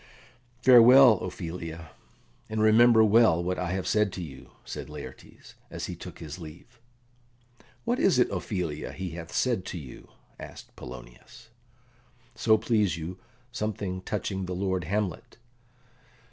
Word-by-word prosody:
"Farewell, 125 -2 +8
Ophelia, 80 -3 -7 0.6
and 110 0 -3
remember 110 +1 +6
well 110 -6 +4
what 90 +1 -2
I 90 - -2
have 95 -1 -3
said 105 -2 +1
to 90 - -5
you," 75 -5 -11 0.2
said - - -7
Laertes, - - -11 0.2
as - - -5
he - - -6
took - - -10
his 80 +2 -8
leave. 80 +7 -12 1.1
"What 240 +2 0
is 190 - +3
it, 125 - +3
Ophelia, 90 -5 -4
he 95 -2 -5
hath 80 0 -8
said 120 -7 0
to - - -6
you?" 70 -6 -11 0.3
asked - - -11
Polonius. - - -12 0.8
"So 110 -1 +3
please 105 -5 +1
you, 85 +3 -7 0.3
something 105 -5 -4
touching 95 -1 -3
the 90 - -4
lord 95 -2 -2
Hamlet." 100 0 -3
95 Hz, 135 wpm, -27 LUFS, 85-110 Hz, 1.1 s, Farewell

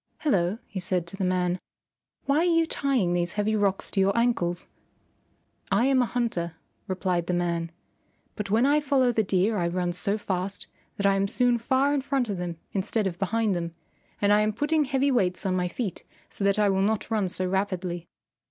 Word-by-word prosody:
"Hello," 195 - +1
he 195 - -6
said 180 -1 -1
to 170 - -7
the 195 - -3
man, 180 0 +1 0.7
"why 280 +1 +2
are 325 - +3
you 330 -2 +3
tying 260 - 0
these 175 0 0
heavy 210 +1 0
rocks 200 -2 0
to 195 - -1
your 195 +3 +3
ankles?" 185 -8 +1 1.0
"I 240 - +3
am 265 -1 +4
a 245 - +1
hunter," 180 -10 -2 0.3
replied 185 -3 -1
the 180 - 0
man, 170 -1 -1 0.6
"but 210 -2 -4
when 225 +5 +3
I 290 +2 +4
follow 270 -4 +2
the 225 - +2
deer 195 +3 +1
I 170 - +1
run 175 0 -1
so 200 +4 -1
fast 190 -1 -3 0.3
that 200 - -1
I 200 - +5
am 195 0 +1
soon 245 +2 +2
far 265 +4 +2
in 285 - +1
front 265 -3 -1
of 195 -3 -2
them 175 -2 -4
instead 210 +2 -1
of 175 -3 -3
behind 215 +1 +1
them, 170 -1 -3 0.4
and 205 0 +4
I 210 - +5
am 215 0 +1
putting 295 +6 +1
heavy 275 +1 +1
weights 190 -6 +1
on 185 -1 +1
my 180 -1 0
feet 190 0 -4 0.3
so - - -5
that 200 0 +3
I 210 -1 +4
will 190 -1 +2
not 215 +2 0
run 210 -4 +1
so 185 +1 -2
rapidly." 185 -2 -2
200 Hz, 205 wpm, -26 LUFS, 180-240 Hz, 1.0 s, I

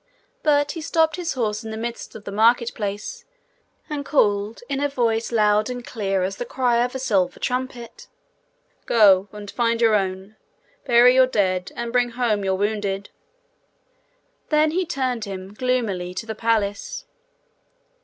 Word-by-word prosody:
But 290 -1 +2
he 330 - -6
stopped 320 0 +2
his 355 -2 -3
horse 220 -3 -2
in 220 - -7
the 220 - -5
midst 235 0 -6
of 215 - -9
the 200 - -7
market 230 +3 +3
place, 210 - -5 0.6
and 295 -2 -4
called, 210 -6 +1
in 275 -1 -2
a 290 0 0
voice 230 -4 0
loud 215 0 +3
and 245 -1 -6
clear 195 -4 -1
as 195 +1 -3
the - - -3
cry 245 -1 +1
of 250 +2 -3
a - - 0
silver 195 -9 0
trumpet, 250 -2 -4 0.8
'Go 200 -4 +5
and 205 -1 -9
find 230 -1 0
your 225 -2 +4
own. 195 +1 -2 0.5
Bury 240 +1 +6
your 260 0 +5
dead, 185 -6 0
and 235 0 -4
bring 245 -1 +2
home 230 -4 0
your 190 -1 +1
wounded.' 205 -1 -2 1.4
Then 305 0 +3
he 360 +1 -1
turned 255 -8 -2
him 190 0 -7
gloomily 210 -7 -1
to 225 - -4
the 220 - -4
palace. 225 - -1
230 Hz, 160 wpm, -23 LUFS, 205-255 Hz, 1.4 s, Bury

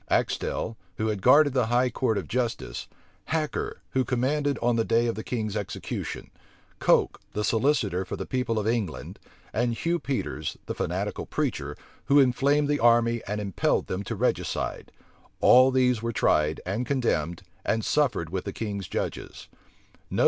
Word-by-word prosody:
Axtel, 110 - 0 0.2
who 110 +1 0
had 105 -3 -2
guarded 145 +5 +6
the 125 -4 +2
high 125 +2 +2
court 115 -3 0
of - - -3
justice, 115 - -2 0.4
Hacker, 155 -2 -2
who 130 - +2
commanded 135 +4 0
on 120 0 +1
the 115 - +2
day 115 +1 +2
of 115 - 0
the 110 - -6
king's 110 -4 -3
execution, 105 -3 -5 0.5
Coke, - - +3
the 105 - -1
solicitor 110 - +1
for 95 - -5
the - - -5
people 125 -3 -1
of 105 - -1
England, 110 -7 -2 0.3
and 120 +1 +1
Hugh 170 +7 0
Peters, 135 -4 -3
the - - -3
fanatical - - -3
preacher, - - -2 0.3
who 140 +1 +5
inflamed 140 +3 +3
the 145 0 +1
army 120 0 +4
and 105 +1 -2
impelled 100 -3 0
them 95 - -3
to - - -3
regicide; - - -1 0.5
all 130 +1 +7
these 125 -3 +2
were 115 0 -1
tried, 75 -7 +2
and 105 +7 -2
condemned, 90 - 0 0.2
and 110 -1 0
suffered 120 - +1
with 95 -1 -3
the 100 - -4
king's 100 -4 -4
judges. - - -5
115 Hz, 160 wpm, -26 LUFS, 105-130 Hz, 0.5 s, all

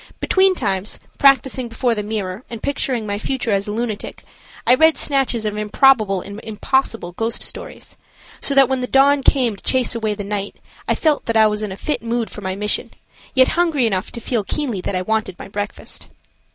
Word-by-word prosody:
Between 380 0 +3
times, 200 - -2 0.2
practicing 265 -2 +4
before 235 +1 0
the 210 - -2
mirror 205 -1 -4
and 230 -2 -7
picturing 260 -5 -1
my 205 0 -3
future 245 0 -2
as 200 0 0
a - - -2
lunatic, 220 -1 -4 0.4
I - - +6
read 320 +4 +5
snatches 265 -5 0
of 210 -1 -1
improbable 210 -2 +3
and 200 +3 -8
impossible 225 -3 -1
ghost 225 +6 -2
stories, - - -7 0.4
so 280 - +1
that 275 -1 +7
when 265 0 0
the 250 - -2
dawn 275 +2 +4
came 250 -5 +2
to - - -15
chase 260 -2 +2
away 220 -3 -1
the 205 - -5
night, 200 0 -3 0.3
I - - +2
felt 310 -3 +1
that 230 -1 +1
I 220 - +7
was 210 0 +1
in 210 -2 -3
a 190 - -6
fit 300 - -2
mood 230 0 -2
for 210 - -8
my 190 -1 -3
mission, 210 +1 -2 0.5
yet 260 -1 +6
hungry 330 -7 +2
enough 190 -4 -1
to 235 - -6
feel 235 -1 -1
keenly 240 -3 -2
that 190 - -3
I 185 - -1
wanted 215 -3 -1
my - - -9
breakfast. 205 0 -5
225 Hz, 205 wpm, -20 LUFS, 205-265 Hz, 0.5 s, that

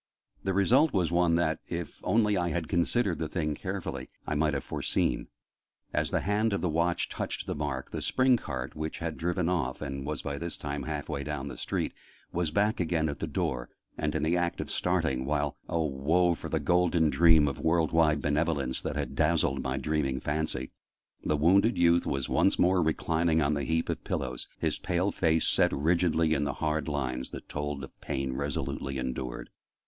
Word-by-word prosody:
The 95 -1 0
result 130 +10 +4
was 90 -4 +1
one 85 -1 +3
that, 80 -2 +1
if 85 -3 -5
only 105 -2 +3
I 90 -2 +1
had 80 -1 -2
considered 90 +3 +1
the 80 - -1
thing 75 -2 -1
carefully, - - -5 0.2
I - - -2
might 75 0 +1
have 70 - -2
foreseen: - - -1 0.7
as - - +1
the - - 0
hand 105 +2 +1
of 100 - 0
the 90 - 0
Watch 85 +2 +1
touched - - -4
the - - -2
mark, 75 -3 -3
the - - -4
spring 130 -1 +3
cart 65 - -5
which 80 +1 -4
had 85 -2 -3
driven 85 +1 -1
off, 70 -8 -1
and 70 0 -4
was 75 +1 -4
by 70 0 -3
this 85 0 -4
time 70 -1 -4
half 75 -2 -4
way 70 -2 -3
down 75 -2 -4
the - - -7
street, - - -2 0.4
was 85 -2 0
back 105 +7 +1
again 80 -3 +1
at 70 - -5
the - - -2
door, - - -2 0.3
and - - -2
in - - 0
the 80 +3 +2
act 85 -1 0
of - - -3
starting, 65 -1 0
while 75 +1 -1
oh 80 -1 +1
woe 80 +6 +2
for 80 - -7
the 80 - 0
golden 85 0 +3
dream 80 -3 +6
of 70 - -3
world 80 0 +2
wide 80 -2 +3
benevolence 75 -3 0
that - - -3
had - - -3
dazzled 80 0 +2
my 65 +1 -2
dreaming 70 -2 0
fancy! 75 -2 -2 0.5
the 75 - +1
wounded 100 +9 +4
youth 85 0 +4
was 70 -2 -1
once - - +3
more 90 +1 +4
reclining 80 +1 +1
on 75 -1 +2
the 70 -2 -1
heap 80 +5 0
of - - -3
pillows, 65 -1 -3
his - - -1
pale 90 +3 0
face 80 -2 +2
set - - +4
rigidly 80 +1 +2
in 75 - +1
the 75 - -1
hard 75 0 -1
lines 65 -4 -2
that - - -9
told 75 -1 -4
of 70 - -11
pain 65 -1 -2
resolutely 70 0 -3
endured. 65 -1 -4
80 Hz, 200 wpm, -29 LUFS, 70-85 Hz, 0.7 s, dream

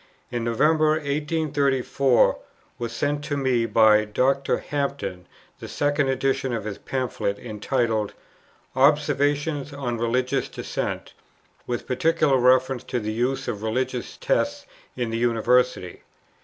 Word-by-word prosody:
In 120 -1 -2
November, 155 +7 +3
1834, 140 -4 +1 0.4
was 120 -1 -3
sent 145 +5 -1
to 145 - -2
me 125 -4 +1
by 110 -2 +5
Dr. 130 +6 +1
Hampden 140 -11 -4 0.3
the - - -8
second 145 -1 0
edition 135 0 0
of 115 -3 -2
his 105 -2 -5
Pamphlet, 125 -6 -2
entitled, 110 -1 -2 0.6
"Observations 145 +1 +2
on 125 -5 -3
Religious 125 +3 0
Dissent, - - -4 0.5
with 120 -1 -3
particular 150 +1 +2
reference 130 0 +3
to 125 -1 -2
the 110 -1 -3
use 130 +4 -1
of 105 - -3
religious 125 +3 -2
tests - - 0 0.3
in 120 -2 -2
the 115 - -2
University." 120 -4 +1
130 Hz, 120 wpm, -24 LUFS, 115-140 Hz, 0.6 s, by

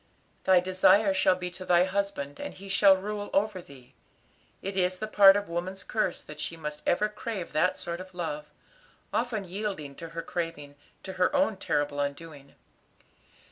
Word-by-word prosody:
"'Thy 190 -1 +6
desire 185 +2 +4
shall 185 -1 +3
be 180 0 -5
to 185 - -7
thy 175 -1 +4
husband, 190 -7 -2
and - - -6
he 195 +1 -10
shall 195 0 +5
rule 205 +1 -4
over 195 -2 +1
thee.' 135 -6 -16 0.7
It 195 0 -4
is 185 -1 +1
part 195 -1 +8
of 205 - -3
woman's 180 +3 -4
curse 215 -5 -1
that 150 0 -11
she 165 +2 -4
must 150 -1 -5
ever 210 +5 +3
crave 210 -3 -6
that 165 +4 +2
sort 170 +1 -5
of 185 -1 -12
love, 150 -4 -4 0.7
often 220 -1 -1
yielding 190 -6 -4
to 165 - -8
her 165 0 -6
craving, 165 -4 -4 0.3
to 190 - -6
her 185 - +3
own 280 -6 +2
terrible 145 -5 -1
undoing. 145 0 -5
185 Hz, 170 wpm, -28 LUFS, 165-200 Hz, 0.7 s, part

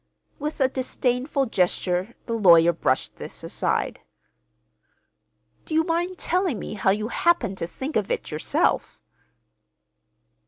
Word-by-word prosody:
With 300 +2 -4
a 265 - +4
disdainful 260 +1 -1
gesture 180 -1 0
the 230 - -3
lawyer 170 -6 +6
brushed 130 -5 -1
this - - -9
aside. - - -1 1.6
"Do 315 - -3
you 320 - +4
mind 345 +2 -1
telling 360 - 0
me - - -6
how 200 -2 +1
you 210 +3 0
happened 235 - +1
to 165 - -2
think 265 - -6
of 210 -3 0
it, - - -3
yourself?" 155 +1 0
235 Hz, 125 wpm, -24 LUFS, 190-305 Hz, 1.6 s, lawyer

